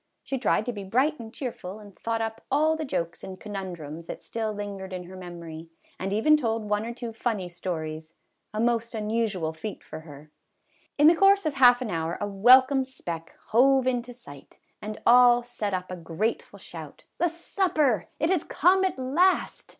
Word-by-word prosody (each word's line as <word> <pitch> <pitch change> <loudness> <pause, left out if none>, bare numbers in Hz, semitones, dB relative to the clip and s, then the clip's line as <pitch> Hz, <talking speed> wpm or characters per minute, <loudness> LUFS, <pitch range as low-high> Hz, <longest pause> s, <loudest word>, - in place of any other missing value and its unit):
She 270 - -3
tried 215 -2 +1
to 245 - -2
be 205 -2 -6
bright 260 +10 +1
and 225 -1 -8
cheerful, 220 -7 -6
and 205 -3 -14
thought 225 +4 -2
up 225 0 -5
all 310 +3 +3
the 315 -1 -4
jokes 170 - -3
and 185 -1 -8
conundrums 175 -6 -7
that - - -7
still 225 -1 -3
lingered 200 -2 -6
in 180 -1 -5
her 185 +2 -11
memory, 170 -3 -9 0.3
and 190 +1 -3
even 265 +10 +4
told 225 -5 -2
one 210 +2 0
or - - -3
two 235 -2 -6
funny 220 -5 -2
stories, 160 -2 -5 0.4
a 215 - -4
most 230 0 0
un 215 -1 -3
usual 200 -9 -1
feat 190 +6 -7
for 155 - -8
her. 150 -1 -13 0.7
In 295 - +5
the 320 - +9
course 390 +2 +4
of 310 - 0
half 250 -2 +6
an 225 - -4
hour 165 0 -2
a 205 - -1
welcome 255 +7 +6
speck 170 -11 -7
" - - -31
hove 265 +3 +4
into 250 -1 -1
sight," 145 - -14 0.2
and 215 0 -6
all 245 0 +7
set 230 -4 -4
up 185 -1 -3
a 185 - -5
grateful 175 +7 -3
shout, - - -10
" - - -46
The 350 - +3
supper! 320 - 0
It 320 +4 +1
has 365 -5 +2
come 375 +4 +3
at 375 - 0
last." 305 +9 +1
220 Hz, 195 wpm, -26 LUFS, 185-260 Hz, 0.7 s, the